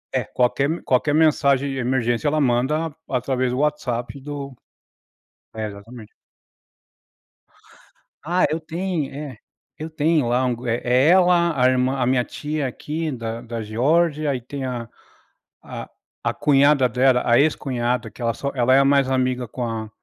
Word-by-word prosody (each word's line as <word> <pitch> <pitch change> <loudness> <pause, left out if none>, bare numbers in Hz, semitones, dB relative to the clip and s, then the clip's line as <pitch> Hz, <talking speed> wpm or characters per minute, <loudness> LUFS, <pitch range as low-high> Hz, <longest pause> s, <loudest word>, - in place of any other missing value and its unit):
É, - - +1
qualquer 125 +2 +1
m 165 - -2
qualquer 140 +3 +1
mensagem 140 -3 +3
de 135 - -4
emergência 120 +1 0
ela 155 +1 +1
manda 145 +4 0
através 130 0 -1
do 125 - -2
WhatsApp 135 -4 -2
do 140 -2 -7 1.0
É 110 -1 -4
exatamente. 105 +2 -11 2.1
Ah 175 +4 +1
eu 155 - -1
tenho 165 -1 -3
é, 140 -4 -7 0.4
eu 155 +1 -6
tenho 155 -3 +1
lá 125 +2 +1
um 125 -1 0
é 115 0 +1
é 125 +3 +3
ela, 175 -3 +4
a 125 - +4
irmã 130 +1 +1
a 125 - +1
minha 125 0 +2
tia 150 +2 -4
aqui 155 +5 -4
da 115 -2 -5
da 115 -1 -6
Geórgia, 150 +8 +1
aí 130 -2 -3
tem 135 +3 -6
a 120 -2 -4 1.4
a - - 0
cunhada 140 -2 +4
dela, 125 +1 +3
a 120 0 +4
ex-cunhada 125 -4 0
que - - -14
ela 115 -1 0
só 140 +3 -4
ela 125 0 +3
é 135 - +5
mais 140 -1 +3
amiga 130 -1 0
com 125 +2 -5
a 110 -2 -4
130 Hz, 155 wpm, -22 LUFS, 125-150 Hz, 2.1 s, é